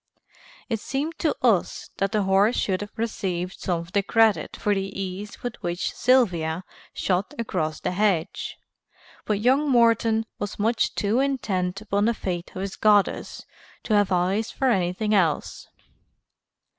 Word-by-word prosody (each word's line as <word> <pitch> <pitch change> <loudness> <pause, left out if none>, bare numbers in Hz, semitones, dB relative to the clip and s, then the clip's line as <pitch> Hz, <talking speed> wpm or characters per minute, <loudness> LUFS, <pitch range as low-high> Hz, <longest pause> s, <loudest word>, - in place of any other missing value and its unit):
It 225 -3 -1
seemed 295 +8 -3
to 310 - +1
us 220 -8 +1
that 195 0 0
the 210 -2 +1
horse 195 +5 +3
should 190 -1 0
have 205 - -8
received 190 -5 -3
some 175 -2 -1
of 170 +1 -12
the 200 - +2
credit 220 -5 +2
for 210 - +1
the 195 0 -3
ease 195 +2 -6
with 245 -1 -5
which 175 +1 -2
Sylvia 180 -10 +2 0.3
shot 185 +1 -1
across 160 -9 -2
the 180 - -2
hedge, 185 -4 0 0.7
but 210 -1 0
young 270 +5 +3
Morton 230 -2 +3
was 205 - -4
much 225 +3 +1
too 210 +4 +1
intent 200 -9 -1
upon 205 -1 0
the 235 0 +2
fate 175 -4 -4
of 185 - -4
his 195 0 -4
goddess 210 -2 +2 0.4
to 220 - -1
have 205 -2 +3
eyes 185 +5 +1
for 265 -2 +1
anything 190 +2 0
else. 175 -7 0
205 Hz, 155 wpm, -25 LUFS, 185-225 Hz, 0.7 s, horse